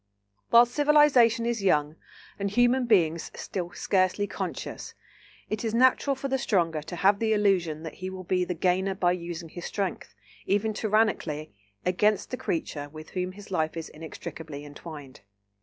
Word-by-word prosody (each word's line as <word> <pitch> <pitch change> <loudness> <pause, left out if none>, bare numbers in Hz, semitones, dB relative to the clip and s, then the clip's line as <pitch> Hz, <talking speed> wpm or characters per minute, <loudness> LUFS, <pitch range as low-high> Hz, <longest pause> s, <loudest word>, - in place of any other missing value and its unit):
While 235 +1 +8
civilisation 255 -4 +4
is 235 -2 -1
young, 150 -5 +2 0.4
and 200 0 -1
human 245 +3 +3
beings 170 -7 +2
still 175 -3 -4
scarcely 190 +1 +1
conscious, - - -6 0.5
it 215 +1 -3
is 225 -1 -1
natural 260 +3 +4
for 270 +1 -4
the 265 0 0
stronger 170 -9 +1
to 165 +4 -7
have 200 +3 +3
the 220 -1 +2
illusion 180 -7 +1
that 160 - -6
he 185 - -3
will 190 0 -7
be 180 0 +1
the 180 0 -3
gainer 185 +3 +1
by 175 -2 +2
using 170 -2 -5
his 175 +2 -8
strength, 185 - -4 0.3
even 205 +2 +1
tyrannically, 205 - 0 0.3
against 205 +3 +1
the 250 - -2
creature 145 -7 -3
with 155 +1 -11
whom 185 0 -3
his 200 0 -13
life 160 -2 -1
is 165 - -5
inextricably 155 -1 -8
entwined. 145 -3 -10
185 Hz, 160 wpm, -27 LUFS, 165-220 Hz, 0.5 s, While